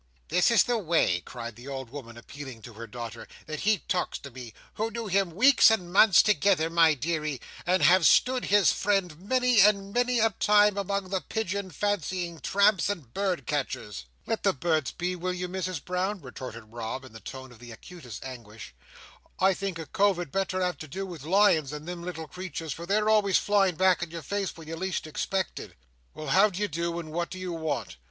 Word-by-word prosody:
"This 180 Hz, -, +3 dB
is 235 Hz, -, +5 dB
the 240 Hz, -2 st, 0 dB
way," 160 Hz, -, +1 dB
cried 120 Hz, -2 st, -8 dB
the 120 Hz, +4 st, -12 dB
old 130 Hz, -3 st, -6 dB
woman, 120 Hz, -5 st, -9 dB
appealing 130 Hz, -2 st, -10 dB
to 120 Hz, -, -10 dB
her 115 Hz, +2 st, -9 dB
daughter, 115 Hz, 0 st, -8 dB, 0.2 s
"that 155 Hz, 0 st, -5 dB
he 210 Hz, -2 st, +1 dB
talks 180 Hz, -1 st, -1 dB
to 140 Hz, -, -11 dB
me, 120 Hz, -2 st, -9 dB, 0.2 s
who 220 Hz, +1 st, -2 dB
knew 230 Hz, +1 st, -5 dB
him 195 Hz, -2 st, +1 dB
weeks 240 Hz, +11 st, +6 dB
and 180 Hz, -6 st, -1 dB
months 195 Hz, -2 st, +7 dB
together, 195 Hz, -6 st, +2 dB
my 165 Hz, -2 st, +5 dB
deary, 150 Hz, -1 st, -2 dB, 0.3 s
and 185 Hz, +1 st, +2 dB
have 180 Hz, -2 st, +6 dB
stood 255 Hz, 0 st, +3 dB
his 205 Hz, -2 st, +4 dB
friend 190 Hz, -6 st, 0 dB
many 250 Hz, +4 st, +2 dB
and 200 Hz, 0 st, +3 dB
many 245 Hz, 0 st, +2 dB
a 225 Hz, 0 st, +3 dB
time 210 Hz, 0 st, +4 dB
among 200 Hz, -1 st, -2 dB
the 190 Hz, -1 st, -1 dB
pigeon 200 Hz, -3 st, -3 dB
fancying 180 Hz, -2 st, -2 dB
tramps 200 Hz, +1 st, +3 dB
and 155 Hz, -, -5 dB
bird 185 Hz, -9 st, -1 dB
catchers." 110 Hz, -, -3 dB, 0.2 s
"Let 225 Hz, -, -2 dB
the 195 Hz, -, +2 dB
birds 155 Hz, 0 st, 0 dB
be, 180 Hz, +1 st, -3 dB
will 180 Hz, +1 st, -3 dB
you, 180 Hz, 0 st, -4 dB
Misses 185 Hz, -2 st, -3 dB
Brown?" 185 Hz, +5 st, -2 dB
retorted 125 Hz, -5 st, -9 dB
Rob, 120 Hz, +3 st, -5 dB
in 125 Hz, -, -14 dB
a -, -, -8 dB
tone 130 Hz, +4 st, -9 dB
of 120 Hz, -, -16 dB
the 120 Hz, -1 st, -11 dB
acutest 125 Hz, -, -10 dB
anguish. 115 Hz, -4 st, -10 dB, 0.7 s
"I 190 Hz, +1 st, +4 dB
think 195 Hz, -2 st, -4 dB
a 165 Hz, -, -6 dB
cove 200 Hz, +1 st, +2 dB
had 175 Hz, -5 st, -5 dB
better 185 Hz, -1 st, -1 dB
have 180 Hz, -4 st, -2 dB
to 155 Hz, -, -8 dB
do 190 Hz, +7 st, -5 dB
with 170 Hz, -7 st, -9 dB
lions 175 Hz, -5 st, +4 dB
than 150 Hz, +1 st, -7 dB
them 175 Hz, 0 st, -6 dB
little 170 Hz, -2 st, -6 dB
creeturs, 165 Hz, -3 st, -6 dB
for 170 Hz, +3 st, -9 dB
they're 210 Hz, +2 st, +1 dB
always 210 Hz, -3 st, +4 dB
flying 195 Hz, -4 st, +2 dB
back 185 Hz, +1 st, +3 dB
in 175 Hz, -, -3 dB
your 165 Hz, -1 st, -7 dB
face 200 Hz, +5 st, -3 dB
when 160 Hz, -1 st, -11 dB
you 165 Hz, -, -5 dB
least 185 Hz, 0 st, -3 dB
expect 190 Hz, +5 st, -2 dB
it. -, -, -10 dB, 0.4 s
Well, 155 Hz, -2 st, -6 dB
how 195 Hz, +8 st, +5 dB
d'ye 200 Hz, +2 st, -2 dB
do 170 Hz, 0 st, -3 dB
and 160 Hz, -2 st, -8 dB
what 170 Hz, +2 st, -2 dB
do 185 Hz, -, -7 dB
you 185 Hz, -1 st, -4 dB
want?" 160 Hz, -, -3 dB
175 Hz, 210 wpm, -27 LUFS, 145-195 Hz, 0.7 s, months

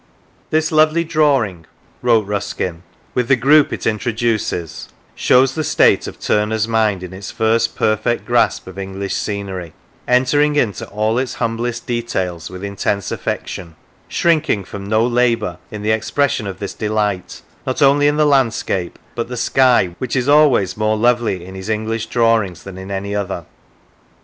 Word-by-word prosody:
" -, -, -36 dB
This 155 Hz, +1 st, +1 dB
lovely 155 Hz, +1 st, +4 dB
drawing," 140 Hz, -, +1 dB, 0.3 s
wrote 115 Hz, -4 st, +3 dB
Ruskin, 100 Hz, -4 st, -3 dB, 0.2 s
" -, -, -34 dB
with 125 Hz, -2 st, 0 dB
the 135 Hz, -, +5 dB
group 140 Hz, +4 st, +4 dB
it -, -, -4 dB
introduces, 110 Hz, -6 st, -2 dB, 0.2 s
shows 130 Hz, +1 st, +3 dB
the 155 Hz, -, -2 dB
state -, -, +3 dB
of -, -, -9 dB
Turner's 105 Hz, +1 st, 0 dB
mind 110 Hz, -5 st, +1 dB
in 90 Hz, 0 st, -8 dB
its 95 Hz, 0 st, -7 dB
first 110 Hz, +1 st, +1 dB
perfect 110 Hz, +2 st, 0 dB
grasp -, -, +1 dB
of 95 Hz, +1 st, -9 dB
English 95 Hz, 0 st, -4 dB
scenery, 95 Hz, -5 st, -4 dB, 0.3 s
entering 145 Hz, +4 st, +3 dB
into 115 Hz, -8 st, 0 dB
all 110 Hz, +3 st, 0 dB
its 130 Hz, -1 st, -3 dB
humblest 115 Hz, +1 st, -2 dB
details 95 Hz, -9 st, -3 dB
with 95 Hz, +1 st, -9 dB
intense 100 Hz, 0 st, -2 dB
affection; 85 Hz, -3 st, -4 dB, 0.3 s
shrinking 155 Hz, -, +1 dB
from 100 Hz, +1 st, -8 dB
no 110 Hz, +1 st, +3 dB
labour 120 Hz, -7 st, +1 dB
in 105 Hz, -1 st, -7 dB
the 110 Hz, -, +1 dB
expression 110 Hz, +1 st, 0 dB
of 95 Hz, -2 st, -5 dB
this 100 Hz, -, -5 dB
delight, 105 Hz, -3 st, -2 dB, 0.2 s
not 130 Hz, -, -1 dB
only 145 Hz, +1 st, +5 dB
in 145 Hz, 0 st, +2 dB
the 155 Hz, -, +4 dB
landscape, 115 Hz, -10 st, +1 dB, 0.2 s
but 115 Hz, -, -3 dB
the 125 Hz, 0 st, -6 dB
sky, 125 Hz, -9 st, +3 dB
which 130 Hz, 0 st, -3 dB
is 130 Hz, 0 st, 0 dB
always 145 Hz, -9 st, +4 dB
more 110 Hz, 0 st, +1 dB
lovely 115 Hz, -6 st, +1 dB
in 95 Hz, -, -10 dB
his 95 Hz, +2 st, -7 dB
English 110 Hz, +1 st, -2 dB
drawings 115 Hz, -7 st, +1 dB
than 100 Hz, -1 st, -9 dB
in 95 Hz, +1 st, -8 dB
any 100 Hz, +1 st, -3 dB
other. 95 Hz, -5 st, -3 dB
110 Hz, 165 wpm, -18 LUFS, 100-125 Hz, 0.3 s, the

